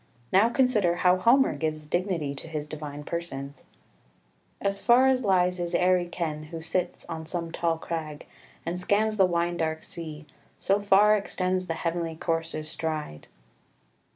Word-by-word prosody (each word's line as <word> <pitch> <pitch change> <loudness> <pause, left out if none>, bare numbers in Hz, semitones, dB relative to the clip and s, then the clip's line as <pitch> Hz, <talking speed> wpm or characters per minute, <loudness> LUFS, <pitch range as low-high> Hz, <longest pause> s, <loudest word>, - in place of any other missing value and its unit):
Now 200 +5 +6
consider 230 -9 +2
how 180 +1 +4
Homer 245 +8 +4
gives 155 -1 -3
dignity 170 -3 -1
to 140 - -9
his 155 -2 -4
divine 150 -1 -7
persons 145 -4 -6 0.9
"As 200 0 -1
far 245 +2 +5
as 260 -1 +3
lies 180 -2 +2
his 175 0 -2
airy 180 0 +3
ken, 155 -3 -4
who 165 +2 -7
sits 175 +2 -2
On 160 - -5
some 165 +1 -4
tall 165 -1 0
crag, 160 -3 -5 0.4
and 175 +2 -3
scans 215 +3 +1
the 190 -2 +5
wine 175 0 0
dark 160 -1 -2
sea: 155 -2 -8 0.3
So 200 +2 +1
far 205 +1 +5
extends 185 -2 -1
the 165 - -2
heavenly 165 0 -2
coursers' 165 -1 -2
stride." 155 - -4
170 Hz, 155 wpm, -27 LUFS, 160-190 Hz, 0.9 s, Now